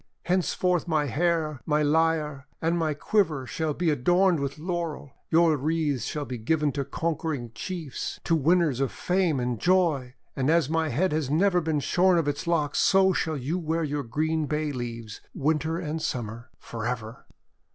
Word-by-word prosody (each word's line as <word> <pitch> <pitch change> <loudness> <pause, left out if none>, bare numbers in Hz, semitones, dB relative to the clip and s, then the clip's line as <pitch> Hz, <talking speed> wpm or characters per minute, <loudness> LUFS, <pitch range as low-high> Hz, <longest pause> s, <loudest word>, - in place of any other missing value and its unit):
Henceforth 180 0 +1
my 155 -3 +1
hair, 155 0 0
my 150 0 +2
lyre, 150 -2 +1
and 165 +1 +1
my 160 -3 0
quiver 155 -5 +1
shall 155 +3 -2
be 170 -3 +1
adorned 175 +5 +3
with 140 0 -3
Laurel. 165 -4 -4 0.2
Your 165 -1 +4
wreaths 150 -2 0
shall 150 -1 -3
be 125 -2 -5
given 150 +5 +1
to 140 0 -2
conquering 155 -5 -3
chiefs, 160 +3 -5
to 165 - +2
winners 160 -3 +2
of 135 -2 0
fame 180 -6 0
and 125 -2 -2
joy; 160 - +2 0.2
and 135 +1 0
as 160 -3 +3
my 160 -1 +1
head 185 +6 +1
has 150 -3 -1
never 180 +4 +3
been 155 -2 0
shorn 180 +4 +3
of 165 -3 +1
its 145 +4 -2
locks, 155 -4 +1
so 190 0 +4
shall 160 -2 -1
you 145 +8 -2
wear 165 0 -1
your 145 -1 -2
green 155 +5 -1
bay 150 0 -1
leaves, 115 -4 -6
Winter 155 +3 0
and 160 -2 -3
Summer 115 -4 -4
— - - -35
for 115 -1 -6
ever!' 115 -1 -5
155 Hz, 175 wpm, -26 LUFS, 140-170 Hz, 0.2 s, Your